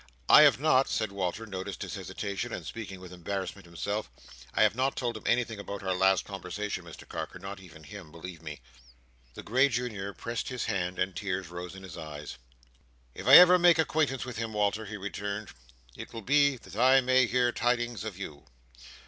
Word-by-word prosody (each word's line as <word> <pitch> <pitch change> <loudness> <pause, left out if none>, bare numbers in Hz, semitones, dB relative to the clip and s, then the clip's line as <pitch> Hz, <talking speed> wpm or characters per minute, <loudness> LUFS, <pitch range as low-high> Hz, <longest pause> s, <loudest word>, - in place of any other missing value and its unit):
I - - +9
have 145 -4 +6
not," 135 -3 +4
said 110 -3 -1
Walter, 100 +3 -3
noticing 95 -2 -6
his - - -5
hesitation, 100 -2 -4
and - - -5
speaking 100 -4 -7
with 90 -1 -11
embarrassment 95 +1 -5
himself: 100 +5 -3 0.4
"I - - +3
have - - +4
not 130 +3 0
told 120 -2 -2
him 110 - -7
anything 120 -3 +1
about 100 0 -6
our 95 -1 0
last 95 +1 +3
conversation, 100 0 -5
Mr 85 - -12
Carker; - - -6
not 95 +2 -8
even 80 -4 -14
him, 95 -2 -11
believe 85 +1 -9
me. 75 -4 -8 0.7
The - - -8
grey 130 +5 +3
Junior 110 -5 -3
pressed 115 0 -4
his 125 -1 -3
hand, 90 -1 -2
and 95 0 -1
tears 95 -3 -3
rose 90 +1 -7
in 95 - -11
his 95 - -9
eyes. 75 -4 -8 0.7
"If 95 - -8
I 135 - +10
ever 180 0 +10
make 175 -1 +6
acquaintance 155 -5 +1
with 125 -3 -7
him, 115 -1 -3
Walter," 105 +1 0
he 105 +1 -6
returned, 100 +1 -5 0.5
"it - - -9
will 115 -2 -7
be 140 +2 +3
that 95 -4 -13
I 130 +4 +5
may 130 0 +4
hear 120 0 +2
tidings 120 -1 -1
of 110 -5 -6
you. 75 -7 -8
100 Hz, 195 wpm, -29 LUFS, 95-120 Hz, 0.7 s, I